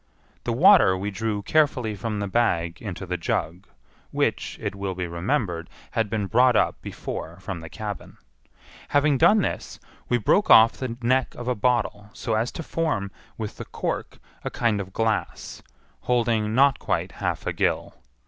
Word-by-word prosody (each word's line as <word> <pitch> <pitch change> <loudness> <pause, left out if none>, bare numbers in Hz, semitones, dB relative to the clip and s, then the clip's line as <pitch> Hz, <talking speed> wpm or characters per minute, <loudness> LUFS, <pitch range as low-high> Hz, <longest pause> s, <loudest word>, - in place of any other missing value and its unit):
The 120 - 0
water 120 - +6
we 100 +2 -3
drew 105 0 -2
carefully 130 -6 +1
from 105 +2 -3
the 100 0 -2
bag 85 -6 0
into 95 -3 -6
the 90 0 -2
jug; 85 +2 -2 0.4
which, - - -1
it - - -3
will 100 -2 -4
be 90 0 -3
remembered, 85 - -2 0.2
had 110 -2 0
been 105 -1 -1
brought 125 +4 +4
up - - +1
before 85 +3 -6
from 95 -2 -5
the 80 0 -9
cabin. 105 -1 -7 0.7
Having 145 -1 +2
done 200 +5 +5
this, - - -4 0.3
we 120 - +3
broke 120 - +2
off 115 +1 +8
the 125 -3 -5
neck 130 +2 +1
of 120 - -7
a 125 - +2
bottle 105 -2 0
so 115 -2 -3
as 110 +3 0
to 165 - -5
form, 150 -14 -1 0.3
with 110 -2 -5
the - - -6
cork, - - -4 0.3
a - - -2
kind 115 -4 0
of 95 -1 -8
glass, 110 +1 -2 0.4
holding 115 -3 +1
not 135 0 +4
quite - - -1
half - - -3
a - - -1
gill. - - 0
110 Hz, 170 wpm, -25 LUFS, 100-125 Hz, 0.7 s, off